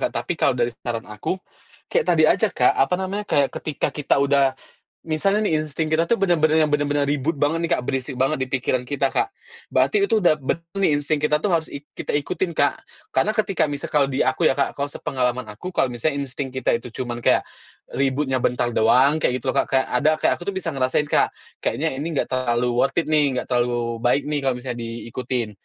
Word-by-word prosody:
Kak. -, -, -1 dB
Tapi -, -, -1 dB
kalau -, -, +1 dB
dari 120 Hz, 0 st, 0 dB
saran 115 Hz, -2 st, -4 dB
aku, 105 Hz, -, -4 dB, 0.6 s
kayak -, -, +2 dB
tadi -, -, +4 dB
aja, -, -, +4 dB
Kak, -, -, +3 dB
apa -, -, +2 dB
namanya, 190 Hz, +3 st, -3 dB
kayak 140 Hz, -2 st, +2 dB
ketika 150 Hz, -3 st, -2 dB
kita 150 Hz, -2 st, +1 dB
udah 140 Hz, -1 st, +3 dB, 0.5 s
misalnya 195 Hz, +7 st, +1 dB
nih, 155 Hz, -4 st, +1 dB
insting 155 Hz, +1 st, -3 dB
kita 160 Hz, +1 st, +3 dB
tuh 235 Hz, -, +3 dB
benar-benar 160 Hz, -4 st, +3 dB
yang 150 Hz, -, 0 dB
benar-benar 145 Hz, 0 st, +1 dB
ribut 145 Hz, +2 st, 0 dB
banget 150 Hz, +4 st, +1 dB
nih, 170 Hz, -, -2 dB
Kak, -, -, -4 dB
berisik 135 Hz, 0 st, -2 dB
banget 135 Hz, +3 st, +1 dB
di -, -, -5 dB
pikiran 130 Hz, -1 st, 0 dB
kita, 135 Hz, +1 st, 0 dB
Kak. 400 Hz, -1 st, 0 dB, 0.4 s
Berarti 415 Hz, -1 st, +3 dB
itu 225 Hz, -, +2 dB
udah 175 Hz, -6 st, +4 dB
benar 165 Hz, +5 st, -3 dB
nih 190 Hz, -5 st, +3 dB
insting 145 Hz, +1 st, -1 dB
kita 150 Hz, 0 st, +3 dB
tuh -, -, +2 dB
harus 165 Hz, -2 st, +1 dB
ik 145 Hz, +1 st, -8 dB
kita -, -, -4 dB
ikutin, 170 Hz, +5 st, -1 dB
Kak. 145 Hz, -1 st, +2 dB, 0.4 s
Karena 135 Hz, +11 st, +3 dB
ketika 200 Hz, -3 st, +1 dB
misal 145 Hz, 0 st, -4 dB
kalau 145 Hz, -2 st, +3 dB
di 130 Hz, -, -2 dB
aku 130 Hz, +6 st, 0 dB
ya, -, -, +4 dB
Kak, 140 Hz, -, 0 dB
kalau 140 Hz, 0 st, -2 dB
sepengalaman 125 Hz, -3 st, -2 dB
aku 105 Hz, -, -7 dB
kalau 170 Hz, -, +2 dB
misalnya 140 Hz, +5 st, -1 dB
insting 130 Hz, +1 st, -5 dB
kita 130 Hz, -2 st, 0 dB
itu 120 Hz, +1 st, -6 dB
cuman 120 Hz, -1 st, -6 dB
kayak, -, -, +4 dB, 0.5 s
ributnya 135 Hz, -1 st, 0 dB
bentar 120 Hz, 0 st, 0 dB
doang, 130 Hz, +7 st, +4 dB
kayak 125 Hz, -4 st, +1 dB
gitu 130 Hz, -, 0 dB
loh, -, -, -9 dB
Kak. -, -, 0 dB
Kayak 130 Hz, -, +2 dB
ada 135 Hz, +5 st, +3 dB
kayak -, -, +2 dB
aku 175 Hz, -, -7 dB
tuh 200 Hz, -, -2 dB
bisa 185 Hz, -3 st, -2 dB
ngerasain, 130 Hz, +1 st, +1 dB
Kak. 150 Hz, -, +1 dB, 0.2 s
"Kayaknya 160 Hz, +2 st, -1 dB
ini 160 Hz, +2 st, -3 dB
nggak 135 Hz, -, -1 dB
terlalu 120 Hz, -1 st, 0 dB
worth -, -, +2 dB
it 165 Hz, -2 st, 0 dB
nih, 145 Hz, -4 st, +3 dB
nggak 125 Hz, -, -3 dB
terlalu 120 Hz, -1 st, 0 dB
baik 125 Hz, +4 st, +2 dB
nih, 150 Hz, -1 st, -1 dB
kalau 135 Hz, -2 st, 0 dB
misalnya 125 Hz, -1 st, -5 dB
diikutin," 115 Hz, +1 st, -4 dB
140 Hz, 220 wpm, -22 LUFS, 125-155 Hz, 0.6 s, tadi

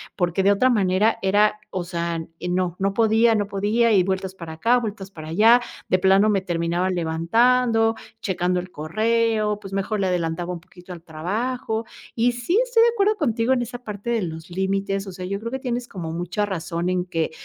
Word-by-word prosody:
porque 175 Hz, +1 st, 0 dB
de 200 Hz, -, +5 dB
otra 230 Hz, +6 st, +3 dB
manera 205 Hz, -1 st, +2 dB
era, 210 Hz, +2 st, +3 dB
o 185 Hz, -, -2 dB
sea, 170 Hz, -1 st, -3 dB, 0.2 s
eh, 180 Hz, -, -5 dB
no, 180 Hz, -1 st, 0 dB
no 195 Hz, 0 st, 0 dB
podía 225 Hz, +1 st, +4 dB
no 205 Hz, -1 st, 0 dB
podía. 210 Hz, +4 st, +1 dB
Y 190 Hz, -3 st, +5 dB
vueltas 190 Hz, 0 st, -2 dB
para 170 Hz, -3 st, -8 dB
acá, 230 Hz, +10 st, +2 dB
vueltas 210 Hz, -5 st, -4 dB
para 155 Hz, -2 st, -9 dB
allá, 225 Hz, +8 st, +5 dB, 0.3 s
de 185 Hz, -, +4 dB
plano 195 Hz, +3 st, +4 dB
me 195 Hz, -2 st, +2 dB
terminaba 175 Hz, 0 st, -1 dB
levantando, 225 Hz, +8 st, +2 dB, 0.3 s
checando 180 Hz, -1 st, 0 dB
el 180 Hz, +1 st, -7 dB
correo. 215 Hz, +5 st, 0 dB
Pues, 195 Hz, -, -9 dB
mejor 195 Hz, +2 st, -1 dB
le 190 Hz, -, +1 dB
adelantaba 175 Hz, -1 st, -1 dB
un 175 Hz, -, -6 dB
poquito 180 Hz, +1 st, -13 dB
al 170 Hz, -, -11 dB
trabajo, 220 Hz, +8 st, -3 dB, 0.3 s
y 240 Hz, +1 st, +3 dB
sí, 240 Hz, -, 0 dB
estoy 485 Hz, -2 st, +3 dB
de 470 Hz, -, +5 dB
acuerdo 425 Hz, -2 st, +2 dB
contigo 245 Hz, -, +1 dB
en 245 Hz, -, +1 dB
esa 245 Hz, +1 st, -5 dB
parte 210 Hz, +1 st, -6 dB
de 235 Hz, -2 st, +1 dB
los 160 Hz, 0 st, -6 dB
límites. 195 Hz, +2 st, -1 dB
O 190 Hz, -, -6 dB
sea, 185 Hz, 0 st, -7 dB
yo 200 Hz, +2 st, -3 dB
creo 230 Hz, +2 st, -5 dB
que 265 Hz, -, -3 dB
tienes 245 Hz, -2 st, -3 dB
como 165 Hz, -4 st, -6 dB
mucha 175 Hz, +5 st, -2 dB
razón 170 Hz, -2 st, -3 dB
en 180 Hz, 0 st, 0 dB
que, 165 Hz, -3 st, -2 dB
195 Hz, 205 wpm, -23 LUFS, 180-230 Hz, 0.3 s, de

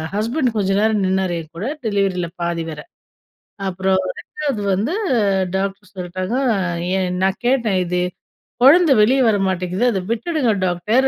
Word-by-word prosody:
Husband 235 Hz, +3 st, 0 dB
கொஞ்சம் 195 Hz, -1 st, +1 dB
நேரம் 215 Hz, -2 st, +2 dB
நின்னாரு 190 Hz, -2 st, 0 dB
என்கூட, 170 Hz, +7 st, -7 dB, 0.2 s
டெலிவரில 195 Hz, -4 st, 0 dB, 0.2 s
பாதி 170 Hz, -1 st, -1 dB
வர. 150 Hz, -1 st, -7 dB, 0.9 s
அப்புறம் 190 Hz, +1 st, +1 dB, 0.2 s
2வது 285 Hz, -8 st, -4 dB
வந்து, 220 Hz, -, -1 dB, 0.6 s
டாக்டர் 195 Hz, 0 st, -4 dB
சொல்லிட்டாங்க, 185 Hz, +4 st, -4 dB, 0.2 s
அ -, -, -1 dB, 0.4 s
ஏன் 180 Hz, -1 st, -1 dB
நான் 190 Hz, 0 st, 0 dB
கேட்டேன், 230 Hz, -7 st, +2 dB
இது 180 Hz, +1 st, -1 dB, 0.6 s
குழந்தை 320 Hz, +4 st, +7 dB
வெளிய 255 Hz, +6 st, +4 dB
வர 215 Hz, -2 st, +3 dB
மாட்டேங்கிது, 185 Hz, +2 st, -1 dB
அத 195 Hz, -, -1 dB
விட்டுடுங்க 245 Hz, +2 st, 0 dB
டாக்டர் 210 Hz, +9 st, +1 dB
195 Hz, 135 wpm, -20 LUFS, 185-230 Hz, 0.9 s, குழந்தை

